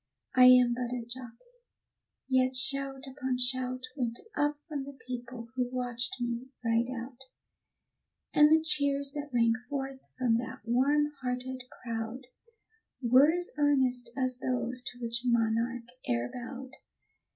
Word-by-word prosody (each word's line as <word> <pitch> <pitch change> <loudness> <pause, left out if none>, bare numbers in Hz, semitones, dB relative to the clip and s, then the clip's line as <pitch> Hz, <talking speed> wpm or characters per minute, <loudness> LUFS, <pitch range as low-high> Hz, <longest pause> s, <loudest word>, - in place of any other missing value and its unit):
I 255 -1 +8
am 250 -1 +8
but 245 0 -3
a 245 -2 -3
jockey, 255 - -10 0.7
yet 260 0 +2
shout 270 +1 0
upon 260 -1 -2
shout 255 0 -1
Went 240 -4 -1 0.2
up 290 0 +1
from 295 -4 -3
the 280 -1 -10
people 245 -1 -6
who 250 -1 0
watched 245 -2 -1
me 240 +1 -3 0.2
ride 230 +1 +2
out; 255 +1 -7 1.1
And 300 0 +7
the 315 0 +5
cheers 285 -3 +1
that 290 0 -5
rang 230 -2 +4 0.2
forth 270 -2 -4 0.2
from 245 -3 +3
that 235 0 -5
warm 285 +5 +3
hearted 255 0 -3
crowd, 230 +2 -5 0.7
Were 260 +4 +6
as 355 +1 0
earnest 260 -4 +2
as 255 -1 +1
those 250 -1 -1
to 245 - -5
which 235 0 -1
monarch 235 0 +1 0.2
e'er 120 0 0
bowed. 255 +1 -7
255 Hz, 140 wpm, -30 LUFS, 240-270 Hz, 1.1 s, I